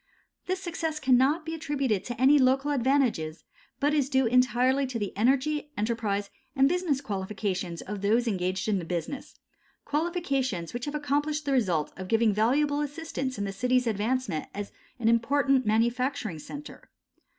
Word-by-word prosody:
This 370 +1 -1
success 330 -4 -3
cannot 265 +4 +3
be 325 - -4
attributed 275 - -1
to 240 -2 -5
any 280 +3 +6
local 270 +2 +3
advantages, 245 - +1 0.4
but 290 +1 +2
is 285 -3 +1
due 265 -2 +3
entirely 255 +3 +3
to 250 -2 -4
the 205 -3 -4
energy, 275 +7 +1
enterprise 210 -2 -1 0.2
and 270 0 +5
business 335 -4 0
qualifications 190 -5 -3
of 205 0 -6
those 225 +4 +2
engaged 185 -2 -1
in 205 -3 +1
the - - -5
business, 175 - -5 0.5
qualifications 275 - -1
which 240 0 -4
have 295 0 -4
accomplished 295 +1 -1
the 280 - 0
result 185 - +1
of 185 - -6
giving 225 0 +3
valuable 285 +7 +2
assistance 290 -3 -4
in 200 - -2
the 195 - -4
city's 250 +5 +1
advancement 220 -4 -1
as 205 0 -5 0.3
an 235 -2 -1
important 260 +2 +3
manufacturing 235 - 0
centre. 285 - -10
255 Hz, 155 wpm, -28 LUFS, 210-285 Hz, 0.5 s, any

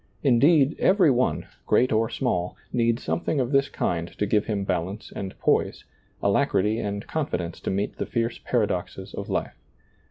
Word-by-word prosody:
Indeed, 140 +3 +4
every 185 -6 +5
one, 125 0 +1 0.2
great 125 - +3
or 110 0 +2
small, 90 -10 -1 0.2
needs 115 0 +1
something 160 -3 -1
of 125 0 0
this 140 0 +3
kind 85 -1 -1
to 105 - +1
give 105 +1 +1
him 105 -3 -1
balance 95 +3 -3
and 95 -1 -5
poise, - - +1 0.4
alacrity 105 0 +2
and 100 -1 -3
confidence 90 - -3
to - - -4
meet 100 +2 -2
the - - -2
fierce 115 -1 -1
paradoxes 95 -4 -2
of 100 - -6
life. - - -2
115 Hz, 160 wpm, -25 LUFS, 100-130 Hz, 0.4 s, every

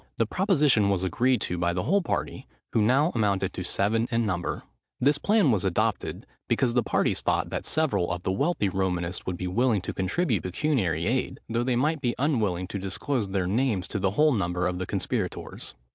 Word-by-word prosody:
The 115 - +2
proposition 145 - +2
was 95 -2 +1
agreed 120 +6 +1
to 90 - -2
by 85 0 +1
the 90 0 -2
whole 195 - +2
party, 170 - -3 0.3
who 110 - +3
now 135 +10 +3
amounted 100 -4 0
to 90 - -4
seven 110 +6 0
in 115 -2 +1
number. 90 -3 -2 0.4
This 145 +2 +3
plan 205 - +3
was 105 -5 +1
adopted, 95 -4 -1 0.2
because 120 -3 +1
the 125 - +3
parties - - 0
thought, - - 0
that - - -3
several 155 - +1
of 90 0 -4
the - - 0
wealthy 140 - +1
Romanists 90 -2 -2
would 90 -1 -2
be 90 - -4
willing 110 +3 +1
to - - -5
contribute 110 - 0
pecuniary 90 - 0
aid, 125 +4 -1
though 115 +1 0
they 125 0 0
might 150 +4 +1
be 120 -3 0
unwilling 110 - 0
to 100 - -4
disclose 100 +4 -2
their 95 -2 0
names 105 -1 0
to 100 - -2
the 95 - +1
whole 155 0 +5
number 90 -4 -1
of 90 0 -1
the 95 - -3
conspirators. - - -3
105 Hz, 200 wpm, -26 LUFS, 90-130 Hz, 0.4 s, whole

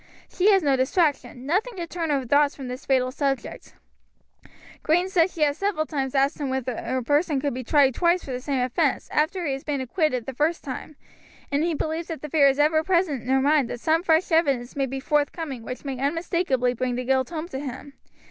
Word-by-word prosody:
She 375 +3 +2
has 385 -3 +4
no 280 -2 +3
distraction, 265 -2 0
nothing 400 - 0
to 345 - -3
turn 335 -1 -4
her 275 -3 0
thoughts 285 +3 +3
from 270 -2 -7
this 250 +3 -7
fatal 255 -1 +2
subject. 275 -1 -3 1.1
"Green 350 +4 +2
says 360 -1 +3
she 315 - 0
has 290 +1 +1
several 390 -6 0
times 275 -4 -3
asked 275 +2 +1
him 280 - -1
whether 260 -1 -2
a 250 +3 -3
person 290 +2 +1
could 285 -1 -1
be 255 +1 -5
tried 275 +1 +4
twice 345 +6 +2
for 270 - -7
the 250 0 -4
same 275 -1 -1
offense, 250 0 0
after 325 +4 0
he 280 - 0
has 270 - -6
been 290 -2 -2
acquitted 260 -2 -1
the 270 - -5
first 305 +6 0
time, 280 +2 -7 0.6
and 285 +2 +1
he 335 -1 0
believes 320 +3 -3
that 320 -4 -6
the 300 - -5
fear 290 -3 +5
is 270 0 +2
ever 310 +2 +3
present 340 -7 +1
in 250 - -9
her 265 0 +3
mind 285 -3 +3
that 245 - -5
some 320 +5 +2
fresh 335 0 +2
evidence 275 -7 +1
may 275 -1 0
be 270 +1 -4
forthcoming 295 -1 -1
which 250 +4 -8
may 270 -2 -4
unmistakably 280 -4 0
bring 250 0 -2
the 250 0 -3
guilt 260 0 +1
home 330 -1 -5
to 265 - -5
him. 280 0 -7
285 Hz, 225 wpm, -24 LUFS, 260-325 Hz, 1.1 s, fear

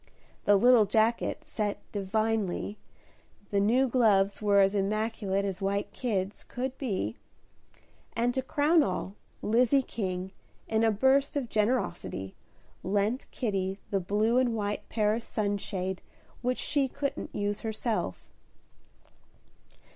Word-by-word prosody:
The 205 - +6
little 235 +1 +6
jacket 220 +3 +1
set 210 -2 -2
"divinely," 210 0 -1 0.7
the 200 - +2
new 240 +7 +3
gloves 210 -6 +3
were 205 -1 +4
as 195 0 +4
immaculate 205 -1 0
as 195 -1 -4
white 200 +1 -1
kids 200 -5 -2
could 255 +1 -4
be, 190 - -2 1.0
and 240 +2 +1
to 260 - 0
crown 295 +5 +3
all, 190 -4 -2 0.3
Lizzie 250 +5 +3
King, 185 -5 -4 0.4
in 220 0 +1
a 225 - +5
burst 265 +7 +3
of 270 -5 -2
generosity, 210 - -1 0.5
lent 205 +6 0
Kitty 195 -5 -2
the 195 - +2
blue 210 +6 +2
and 245 -3 +1
white 205 -1 -3
Paris 215 +1 +1
sunshade 200 -3 -2 0.4
which 250 +1 0
she 280 -2 +1
couldn't 280 +2 -4
use 205 0 -1
herself. 220 - -2
210 Hz, 120 wpm, -29 LUFS, 195-240 Hz, 1.0 s, The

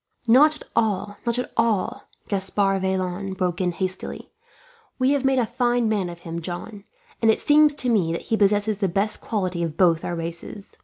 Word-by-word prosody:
"Not 285 +7 +6
at - - -11
all, 205 -2 0
not 235 0 +1
at 250 - -3
all," 230 +3 0 0.2
Gaspard 195 0 0
Vaillant 190 0 -2
broke 180 -2 -1
in 180 -1 +1
hastily, 185 +1 -4 0.7
"we 260 +1 +2
have 285 -2 +1
made 270 0 +2
a 245 - +3
fine 240 0 +1
man 205 -5 0
of 170 0 -10
him, 170 0 -5
John; 195 +5 -7 0.4
and 225 - +4
it 220 - +4
seems 295 0 +4
to 255 - -4
me 200 -9 +2
that 170 - -3
he - - +6
possesses 205 0 +2
the 200 - +1
best 200 +4 0
qualities 185 -6 -2
of 160 -1 -6
both 170 -3 +3
our 175 - -3
races. 170 +4 -6
200 Hz, 195 wpm, -23 LUFS, 180-230 Hz, 0.7 s, Not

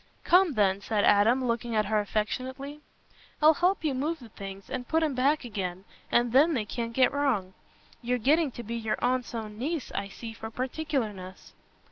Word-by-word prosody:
"Come, 360 -2 +5
then," 200 -1 +2
said 210 0 0
Adam, 230 +6 +4
looking 235 -1 -1
at 215 -1 +2
her 215 +1 +1
affectionately, 260 +8 -3 0.6
"I'll 310 +1 +7
help 360 +4 +1
you 300 -3 +1
move 300 +6 -1
the 240 -6 -13
things, 195 -2 -9
and 250 -2 -5
put 320 0 +2
'em 305 -3 0
back 275 +3 +1
again, 190 -5 -4 0.3
and 240 0 +3
then 295 +6 +5
they 220 -4 -1
can't 230 +2 -4
get 260 +2 +3
wrong. 245 -10 0 0.5
You're 250 +1 0
getting 295 +6 +3
to 240 - -7
be 230 +1 -6
your 225 -2 -1
aunt's 250 -1 0
own 215 -1 -6
niece, 300 +2 -3
I 200 - -3
see, 225 +3 -8
for 220 0 -7
particularness." 245 -7 -4
240 Hz, 185 wpm, -28 LUFS, 215-280 Hz, 0.6 s, I'll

